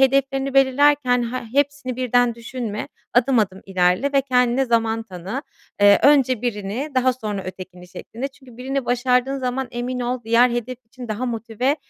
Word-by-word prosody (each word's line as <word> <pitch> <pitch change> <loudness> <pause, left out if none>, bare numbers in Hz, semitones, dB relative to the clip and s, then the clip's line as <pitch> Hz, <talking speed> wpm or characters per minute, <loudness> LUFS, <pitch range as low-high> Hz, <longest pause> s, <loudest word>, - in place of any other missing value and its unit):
hedeflerini 270 0 +2
belirlerken 270 -2 +4
he 255 +1 -3
hepsini 280 -3 -1
birden 245 -2 +2
düşünme, 230 -2 -5 0.3
adım 250 +1 +3
adım 190 -3 0
ilerle 185 +8 +1
ve 275 - +4
kendine 250 -1 +2
zaman 225 -2 +1
tanı. 195 - -6 0.4
Eee, 205 0 +7
önce 260 -5 +4
birini, 220 +4 -3
daha 255 0 +3
sonra 210 -5 -5
ötekini 185 -1 -9
şeklinde. 235 +8 -6
Çünkü 265 -3 -18
birini 265 +1 -3
başardığın 250 +2 +1
zaman 255 0 -2
emin 250 +1 -4
ol 245 0 -2
diğer 235 +2 +4
hedef 240 +1 -3
için 245 0 -10
daha 215 +4 -3
motive 235 +4 -1
250 Hz, 155 wpm, -21 LUFS, 225-265 Hz, 0.4 s, Eee